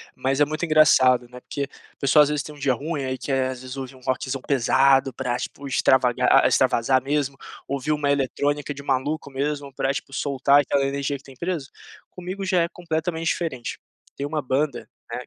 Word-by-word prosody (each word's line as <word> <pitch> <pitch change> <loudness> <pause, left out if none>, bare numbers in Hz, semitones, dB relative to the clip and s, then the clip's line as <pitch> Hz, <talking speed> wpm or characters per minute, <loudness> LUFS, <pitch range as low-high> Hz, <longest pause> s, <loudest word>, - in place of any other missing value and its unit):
mas 135 +2 0
é - - +7
muito 155 +3 -3
engraçado, 130 -6 +5
né, 125 0 -11
porque 140 +2 -5 0.2
a - - -37
pessoa 150 +2 +5
às 145 - 0
vezes 150 -1 0
tem 150 +2 -9
dia 135 -2 +1
ruim 150 +3 -3
aí 130 0 -2
quer, 130 -1 -1
às 130 -1 -8
vezes, 130 +1 -8
ouvir 135 0 -6
um - - -16
rockzão 130 +1 -2
pesado 135 0 +3
pra 125 -1 -2
tipo 140 +2 -6
extravaga 130 -2 +2 0.2
extravasar 130 +3 +3
mesmo, 140 -1 -1 0.3
ouvir 140 +2 -2
uma 150 -2 +1
eletrônica 145 +1 -1
de 140 - -9
maluco 140 +2 -1
mesmo, 140 +1 -3
pra, 135 +1 -1
tipo, 135 - -6
soltar 140 +1 +3
aquela 140 0 0
energia 140 +1 -2
que 140 - -10
tem 135 - -14
presa? 170 -1 -3 0.4
Comigo 185 +2 -6
já 185 -2 +2
é - - 0
completamente 165 -1 -3
diferente. 145 -9 -2 0.4
Tem 140 - -4
uma 150 +1 -2
banda, 140 +2 -1 0.2
né, - - -3
140 Hz, 195 wpm, -24 LUFS, 130-150 Hz, 0.4 s, é